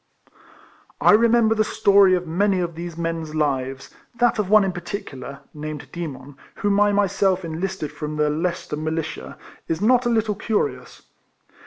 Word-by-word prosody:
I - - +5
remember 230 +1 +4
the 215 -1 +2
story 200 -2 +4
of 180 0 -3
many 190 +4 +1
of 170 -1 -2
these 170 0 -7
men's 165 -2 -3
lives; 135 -3 -2 0.2
that 240 -1 +2
of 200 -3 -1
one 215 0 +6
in 190 - 0
particular, 170 -7 -7
named 150 0 -7
Demon, 145 -5 -7 0.2
whom 205 0 +1
I 205 0 +4
myself 195 -2 +1
enlisted 165 0 -4
from 150 0 -5
the 150 0 +1
Leicester 165 -1 -2
Militia, 155 0 -4 0.3
is 160 - -1
not 245 +4 +3
a - - +2
little 220 -2 +1
curious. 145 - -3
175 Hz, 155 wpm, -22 LUFS, 155-205 Hz, 0.3 s, one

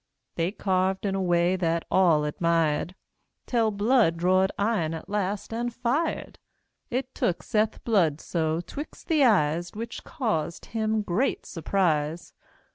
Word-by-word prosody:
They 170 +2 -1
carved 190 -1 0
in 195 - 0
a 195 - -1
way 175 0 +2
that 170 -2 0
all 170 -5 +4
admired, 165 +2 0 0.5
Tell 230 -3 +2
Blood 210 -4 +2
drawed 185 +2 +3
iron 200 -7 0
at 160 - -8
last, 205 +1 -2
and 240 +1 -2
fired. 255 +7 -2 0.5
It 260 0 -3
took 175 - -1
Seth 215 0 0
Bludso 165 -5 +1
'twixt 295 +2 -8
the 310 -3 +4
eyes, 175 - +2
Which 230 +2 -6
caused 215 - -2
him 220 -1 -1
great 205 +8 0
surprise. 165 -2 -1
190 Hz, 130 wpm, -26 LUFS, 165-225 Hz, 0.5 s, all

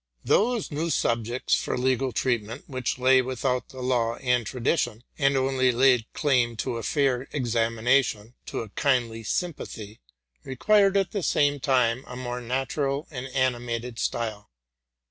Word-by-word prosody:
Those 230 -2 +2
new 155 +3 -2
subjects 120 -3 0
for - - +1
legal 130 +1 +1
treatment, 115 -3 -1
which 130 -2 -3
lay 130 +1 +5
without 125 0 -2
the 130 - -9
law 120 -2 +1
and 125 -2 +1
tradition, 120 -2 -1 0.2
and 140 -1 +3
only 130 -1 +2
laid 125 -2 +3
claim 125 -5 +1
to 115 +2 -3
a - - -4
fair 135 +1 0
examination, 115 -2 +1
to - - -3
a 115 - -8
kindly 120 -2 0
sympathy, 110 - -4 0.4
required, 195 - +3
at 195 -1 +1
the 200 - -2
same 145 -3 +2
time, 125 -2 +2
a 125 - -8
more 125 -1 -4
natural 135 +3 -2
and 130 -2 -5
animated 120 -2 -2
style. 110 -3 -3
125 Hz, 145 wpm, -26 LUFS, 120-135 Hz, 0.4 s, lay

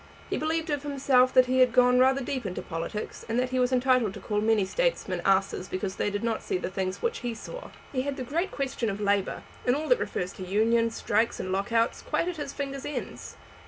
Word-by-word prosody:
He - - +1
believed 320 +1 -1
of 290 -1 0
himself 270 -3 +3
that 255 -1 +7
he 260 +1 +1
had 255 -1 +6
gone 250 0 +5
rather 265 +1 +4
deep 260 0 -3
into 180 - -5
politics, 165 +5 -5
and 230 - 0
that 255 0 0
he 255 - +1
was 250 0 +2
entitled 255 -5 +2
to - - -7
call 210 -1 -1
many 215 -2 +3
statesmen 200 - -1
asses 195 -1 +1
because 190 0 -4
they - - 0
did 205 +1 -3
not 230 -1 0
see - - -1
the 180 - -4
things 190 -1 -3
which 470 0 0
he 240 -2 -3
saw. - - -8 0.2
He 255 - +1
had 275 +1 -3
the 260 - -3
great 330 +9 -1
question 270 -6 -2
of 200 0 -4
labour, 200 -1 0 0.2
and 245 - +3
all 310 +2 -3
that - - +5
refers 180 +1 -3
to 190 - -8
unions, 225 +4 +2
strikes, 220 +3 +1
and 185 - -3
lock 195 +4 -1
outs, 230 0 +2
quite - - -1
at 360 -2 -3
his 290 -2 -4
fingers' 275 -1 -5
ends. 295 - -6
245 Hz, 235 wpm, -27 LUFS, 205-275 Hz, 0.2 s, that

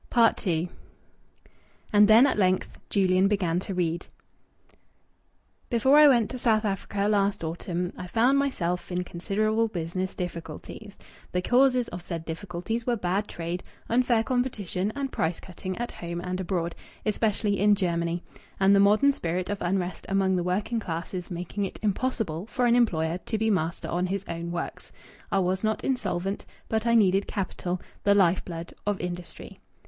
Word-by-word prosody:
II 180 -7 +3 1.3
And 205 0 +7
then 220 +4 +8
at 280 - +2
length 185 -1 +1
Julian 190 -1 +3
began 180 -4 +1
to 190 0 -5
read 175 -1 -1 1.6
"'Before 265 +4 +5
I 300 - +9
went 240 -6 +4
to 255 - -5
South 220 -2 +2
Africa 200 0 -1
last 200 -3 +1
autumn 175 +2 -3
I 180 - -7
found 245 +8 +3
myself 180 -12 -1
in 180 0 -1
considerable 215 +6 0
business 185 -1 -3
difficulties. 175 +4 -7 0.4
The 180 0 0
causes 250 +1 +4
of 175 0 -7
said 165 -2 -5
difficulties 180 +7 -4
were 240 - +2
bad 200 0 -1
trade, 170 +1 -4 0.3
unfair 240 -1 +3
competition, 215 -6 -1
and 275 -1 -3
price 165 +1 -1
cutting 185 0 -6
at 240 0 -3
home 170 0 -5
and 180 +1 -3
abroad, 175 -2 -1 0.3
especially 210 -1 +1
in 205 +1 +5
Germany, 170 -2 -1 0.4
and 195 +1 +5
the - - +5
modern 210 +8 +5
spirit 180 -5 -2
of 205 - -3
unrest 180 -1 -2
among 195 -1 +2
the 180 - +1
working 200 +6 -1
classes 175 -1 -5
making 180 +3 -4
it 190 - -6
impossible 210 -5 -1
for 250 +1 0
an 240 0 +4
employer 170 -8 +2
to 220 - 0
be 220 +1 +1
master 165 -3 -1
on 180 +2 0
his 195 +1 -3
own 170 0 -4
works. 175 - -5 0.4
I 195 - +2
was 190 +1 +1
not 220 0 0
insolvent, 195 -7 -2 0.2
but 220 +1 0
I 235 - +4
needed 195 -3 +4
capital, 185 -2 -3 0.2
the 200 0 +4
life 185 -2 +4
blood 170 -1 -7
of 205 -2 0
industry. 175 0 -7
195 Hz, 160 wpm, -27 LUFS, 175-220 Hz, 1.6 s, I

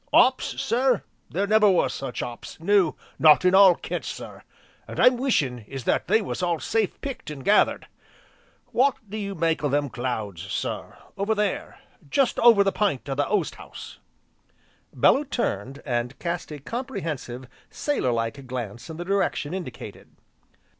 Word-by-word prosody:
"'Ops - - +3
sir, 250 -1 +1 0.3
there 195 +4 0
never 215 0 +5
was 185 - +2
such 135 -2 -4
'ops, 120 +5 -8
no, 185 -1 +3 0.2
not 155 +3 +6
in 180 - +5
all 190 -2 +8
Kent, - - -5
sir. - - -7 0.5
All - - -6
I'm 250 - +6
wishin' 155 - 0
is 135 -2 -6
that - - 0
they 220 - +3
was 190 - -4
all 175 -3 0
safe 220 +3 -1
picked, 275 - -6
an' 145 -3 -7
gathered. 205 +10 +3 0.9
W'ot 270 +2 +3
do 205 - -7
you 200 -2 -4
make 165 -1 0
o' 145 - +2
them 145 -1 0
clouds, 110 -8 -3
sir, 100 - -4 0.2
over 210 +3 +1
there, 210 -2 -2 0.3
jest 265 - +2
over 230 -4 +7
the 195 - +1
p'int 195 -13 -1
o' - - 0
the 145 +1 0
oast 210 - 0
house?" - - -11 0.9
Bellew 285 - +4
turned, 140 - -3
and 120 0 -2
cast 170 -2 -4
a 150 - -5
comprehensive, 150 - -5 0.2
sailor 290 - -1
like 115 +4 -3
glance 120 -2 -6
in 160 - -7
the 175 - -5
direction 190 -5 0
indicated. 130 - -7
170 Hz, 160 wpm, -25 LUFS, 130-210 Hz, 0.9 s, all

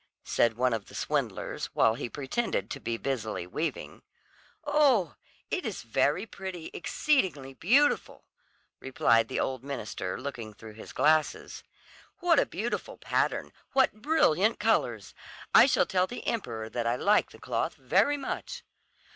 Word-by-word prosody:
said 115 -1 +2
one 125 -1 +2
of 110 -3 -3
the - - -13
swindlers, - - -2
while 110 - +4
he 120 - -5
pretended 145 - -2
to 140 - -4
be 115 -3 -3
busily 115 -8 -3
weaving. 155 - -4 0.6
"Oh, 270 - +3 0.4
it 365 - -1
is 215 - -4
very 145 - +1
pretty, 190 -6 -7
exceedingly 175 - 0
beautiful," 260 - +2 0.5
replied 115 -3 +2
the - - -3
old 130 -1 -2
minister 110 -9 -4
looking 125 -6 -6
through 110 0 -11
his 110 - -11
glasses. 155 0 +1 0.6
"What 345 -5 +4
a - - +2
beautiful 235 - -4
pattern, - - -1 0.2
what 260 -5 +2
brilliant 220 - +3
colours! 120 - 0 0.4
I - - +9
shall - - +3
tell 185 0 +1
the 245 - -8
emperor 115 - -3
that 115 +1 -3
I 120 - +2
like 205 +10 +3
the - - -14
cloth - - -2
very 290 0 +2
much." 275 - -5
155 Hz, 145 wpm, -29 LUFS, -, 0.6 s, I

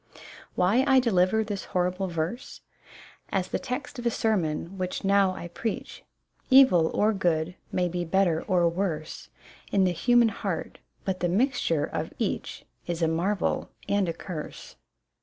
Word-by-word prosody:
Why 205 +9 +3
I 265 - +6
deliver 220 -2 +2
this 205 -2 -5
horrible 180 +2 0
verse? 170 +8 -4 0.7
As 185 -2 -1
the - - -1
text 280 +2 -5
of 240 - -7
a - - +4
sermon, 190 -5 -1
which 185 0 -3
now 195 -1 +3
T 175 - -6
preach: 220 +5 -5 0.5
Evil 260 -12 +6
or 215 +1 +3
good 175 -3 0 0.2
may 180 -1 +1
be 175 0 -2
better 175 -1 +2
or 180 -4 +3
worse 165 -3 -3 0.4
In 195 - +3
the 185 - +3
human 235 +7 +4
heart, - - -4 0.3
but 190 -1 -1
the 175 - 0
mixture 205 - +1
of - - -4
each - - -3 0.2
Is 170 -1 -2
a - - +4
marvel 175 +5 0 0.2
and 200 -3 +1
a - - -1
curse. 165 -2 -8
185 Hz, 155 wpm, -27 LUFS, 170-215 Hz, 0.7 s, I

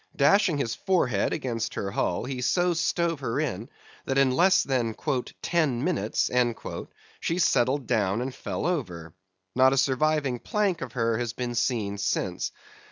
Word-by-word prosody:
Dashing 170 +3 +4
his 115 -5 -1
forehead 125 - +1
against 120 -6 -3
her 100 - -3
hull, 90 - -1
he 130 -1 -4
so 175 +8 +2
stove 170 -1 0
her 130 -1 -2
in, 120 -8 -3 0.4
that 135 - -1
in 135 -1 +4
less 180 +8 +4
than 120 -5 -1 0.5
"ten 150 -8 +1
minutes" 130 - 0 0.9
she 165 - -1
settled 135 -5 +2
down 100 -1 +1
and 130 +1 -3
fell 100 -6 -4
over. 90 - -3 0.4
Not 130 +1 +5
a - - 0
surviving 140 -1 +1
plank 200 - 0
of 125 -3 -6
her 115 -2 0
has 120 -2 -2
been 120 0 -3
seen 110 -4 -1
since. 95 - -1
130 Hz, 155 wpm, -26 LUFS, 115-155 Hz, 0.9 s, Not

